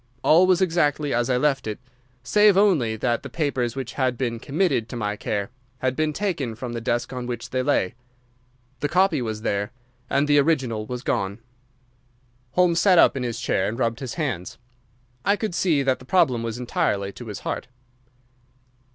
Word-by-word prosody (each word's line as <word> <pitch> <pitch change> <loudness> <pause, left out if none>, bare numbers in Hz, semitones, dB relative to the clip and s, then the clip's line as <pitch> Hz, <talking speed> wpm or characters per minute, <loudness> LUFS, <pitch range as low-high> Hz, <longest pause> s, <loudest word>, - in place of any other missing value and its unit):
All 175 +4 +6
was 185 0 +4
exactly 150 -4 +1
as 120 +1 +1
I 125 - +2
left 135 -3 +1
it, 105 - -3 0.5
save 210 +9 +5
only 160 - +3
that 120 +2 0
the - - -8
papers 135 -6 -1
which 135 -3 -5
had 130 -3 0
been 115 -3 -2
committed 140 - 0
to - - -6
my 105 -3 -2
care 105 +1 -3 0.3
had 130 0 -1
been 155 +1 0
taken 150 - -2
from 120 +1 -6
the 115 - -4
desk 120 +2 -1
on 125 -1 -5
which 120 -1 -5
they 130 - 0
lay. 130 -9 +1 0.9
The 145 - -1
copy 180 -4 +3
was 110 -2 -4
there, 100 -2 -1 0.4
and 140 +1 +2
the 145 0 +5
original 130 -8 0
was 125 0 -5
gone." 100 +1 -1 1.2
Holmes 175 -2 +3
sat 185 -2 +5
up - - +6
in 135 - -2
his 120 -2 -3
chair 95 - 0
and 115 - -5
rubbed 115 -1 0
his 130 -4 -5
hands. 125 - -3 0.7
I 200 - +3
could 215 -3 -3
see 165 -5 +2
that 130 -1 +1
the 130 - -14
problem 130 -6 +3
was 115 0 -4
entirely 100 -5 -1
to 120 +3 -10
his 105 - -6
heart. - - -4
130 Hz, 185 wpm, -24 LUFS, 115-155 Hz, 1.2 s, All